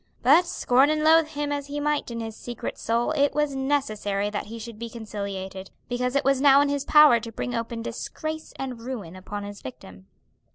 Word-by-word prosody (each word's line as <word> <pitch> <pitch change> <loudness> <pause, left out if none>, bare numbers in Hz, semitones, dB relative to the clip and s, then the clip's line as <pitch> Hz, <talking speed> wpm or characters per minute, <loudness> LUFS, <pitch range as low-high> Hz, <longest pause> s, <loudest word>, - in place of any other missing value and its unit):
But 310 +8 +6
scorn 265 -3 +3
and 305 0 +1
loathe 320 0 +6
him 295 -1 -3
as 285 -1 -3
he 290 +1 -4
might 295 -2 0
in 230 -1 -4
his 225 -1 -6
secret 240 0 -6
soul, 235 +4 0
it 285 -2 +2
was 295 -2 0
necessary 215 -8 -1
that 205 - -4
he 230 +2 -7
should 225 -1 -9
be 235 0 -5
conciliated, 200 -4 -6 0.2
because 250 +1 -1
it 280 - +1
was 270 -1 +3
now 280 -1 +7
in 285 0 +3
his 285 -1 -1
power 300 -6 +7
to 230 +1 -8
bring 245 +2 -4
open 230 0 -3
disgrace 315 +5 -5
and 255 -3 -5
ruin 225 -9 -6
upon 200 +2 -6
his 205 -1 -8
victim. 95 -7 -11
245 Hz, 205 wpm, -25 LUFS, 215-285 Hz, 0.2 s, now